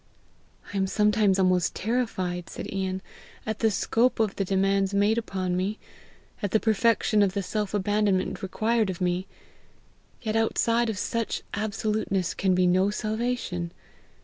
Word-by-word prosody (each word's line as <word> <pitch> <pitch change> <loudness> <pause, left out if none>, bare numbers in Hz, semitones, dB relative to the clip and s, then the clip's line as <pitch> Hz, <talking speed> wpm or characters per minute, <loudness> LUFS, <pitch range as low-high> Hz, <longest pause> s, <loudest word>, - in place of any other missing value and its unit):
"I - - -2
am 190 0 +1
sometimes 210 0 +3
almost 185 -2 +2
terrified," 190 -6 -2
said - - -6
Ian, 190 -1 -2 0.4
"at 220 -1 -3
the 225 - +3
scope 230 +4 +1
of 215 -3 +1
the 195 - 0
demands 195 +1 +1
made 210 +3 +3
upon 185 -5 -2
me, 195 +4 -1 0.6
at 205 - -1
the 220 - +3
perfection 220 -1 +2
of 195 -2 +3
the 200 -1 -1
self 210 +1 -2
abandonment 205 -1 +1
required 220 +2 0
of 185 - -4
me; 180 +1 0 0.9
yet 220 -2 -3
outside 230 +1 +2
of 215 - -3
such 230 +3 -2
absoluteness 205 -4 -1
can 190 -1 +1
be 180 0 +3
no 185 +2 +3
salvation. 215 -5 -2
200 Hz, 150 wpm, -26 LUFS, 185-220 Hz, 0.9 s, sometimes